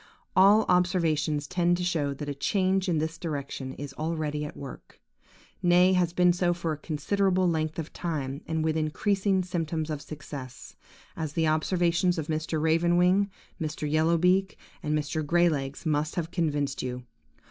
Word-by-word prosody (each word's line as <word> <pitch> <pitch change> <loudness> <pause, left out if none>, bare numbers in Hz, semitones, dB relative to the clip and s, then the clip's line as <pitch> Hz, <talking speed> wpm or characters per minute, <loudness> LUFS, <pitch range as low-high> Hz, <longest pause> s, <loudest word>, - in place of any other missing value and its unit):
All 200 +4 +6
observations 165 -5 +1
tend 175 -1 +1
to 180 - -3
show 160 -5 0
that 145 +1 -6
a 145 - -2
change 190 +5 +1
in 165 - +1
this 160 +1 -2
direction 140 -4 -4
is 140 -1 -7
already 155 -1 -2
at 150 - -7
work, 140 -2 -10 0.6
nay, 180 +1 +5
has 180 -2 +2
been 180 0 +4
so 175 0 +1
for 170 -2 -2
a 155 - -3
considerable 185 +5 0
length 155 -2 -1
of 165 -2 -5
time, 145 -5 -3
and 160 -1 -1
with 160 0 +1
increasing 190 +5 +1
symptoms 165 -3 -2
of 150 -2 -4
success, 145 -4 -9 0.4
as 155 -3 -4
the 165 0 +1
observations 175 +3 +1
of 160 -1 -4
Mr. 155 0 -1
Raven 165 +2 +2
wing, 185 +3 +3 0.3
Mr. 155 -1 -3
Yellow 160 +3 +2
beak, 185 +3 +2 0.2
and 150 0 0
Mr. 150 +1 -2
Grey 175 +3 +3
legs 140 0 -4
must 155 0 0
have 170 -1 -3
convinced 145 -5 -1
you. 125 0 -4
160 Hz, 170 wpm, -27 LUFS, 150-180 Hz, 0.6 s, All